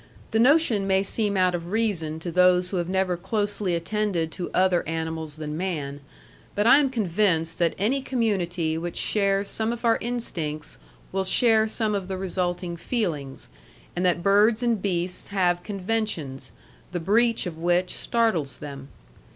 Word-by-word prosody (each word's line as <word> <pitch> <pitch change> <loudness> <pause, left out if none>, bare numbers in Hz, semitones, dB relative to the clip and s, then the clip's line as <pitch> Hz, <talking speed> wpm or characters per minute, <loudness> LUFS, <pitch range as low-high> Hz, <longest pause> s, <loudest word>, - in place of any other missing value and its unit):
The 220 - +2
notion 245 -6 +4
may 190 0 +3
seem 205 0 0
out 185 -1 +3
of 175 0 -4
reason 195 -9 0
to 175 - -4
those 180 +1 +4
who 190 - -1
have 175 0 -2
never 190 -1 +1
closely 205 0 -1
attended 170 -2 -1
to 175 0 -5
other 185 -1 +3
animals 160 -1 -4
than 155 -1 -5
man; 150 -6 -3 0.5
but 205 - +1
I 260 +5 +8
am 280 -2 +2
convinced 180 -7 0
that 170 -2 +2
any 245 +8 +1
community 180 -11 -1
which 175 +1 -5
shares 200 -1 +1
some 220 +1 -1
of 235 0 -5
our 230 -1 +3
instincts 165 -11 -4 0.3
will 195 0 0
share 220 +3 +4
some 215 -1 0
of 195 -3 -2
the 190 -1 -3
resulting 180 -2 -2
feelings, 165 - -3 0.5
and 175 - -1
that 175 -1 +1
birds 210 +4 +4
and 230 -4 +1
beasts 180 -2 -2
have 180 -3 +1
conventions, 195 -9 -3 0.4
the 175 - -1
breach 225 +7 +2
of 165 -3 -6
which 175 +2 +1
startles 205 - 0
them. 140 -2 -8
185 Hz, 160 wpm, -25 LUFS, 170-215 Hz, 0.5 s, I